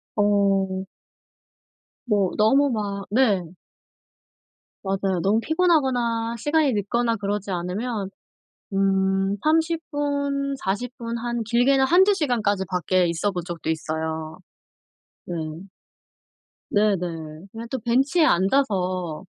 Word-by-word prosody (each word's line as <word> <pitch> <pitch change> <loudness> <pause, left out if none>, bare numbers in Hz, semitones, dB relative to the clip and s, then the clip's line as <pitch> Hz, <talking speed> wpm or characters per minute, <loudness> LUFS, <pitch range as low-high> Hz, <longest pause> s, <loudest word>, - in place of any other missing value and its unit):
어. 195 -2 +2 1.2
뭐 205 -6 +1
너무 270 +7 +4
막 200 -3 -3
네. 205 -7 +2 1.3
맞아요. 195 -1 -1
너무 205 +5 +2
피곤하거나 255 -9 +1
시간이 295 +2 +2
늦거나 230 +3 0
그러지 200 0 -3
않으면 195 +4 -3 0.6
음 195 0 +1
30 290 -3 0
40 235 +3 -3
한 235 0 -3
길게는 250 +4 +3
1-2 375 +8 +5
시간까지 230 - 0
밖에 180 0 +1
있어본 175 +1 -1
적도 170 -3 -5
있어요. 160 0 -3 0.9
네. 175 - -5 1.4
네네. 175 -5 -1
그냥 225 +1 -7
또 260 - -2
벤치에 270 +8 +2
앉아서 185 - +1
210 Hz, 180 characters per minute, -24 LUFS, 190-260 Hz, 1.4 s, 1-2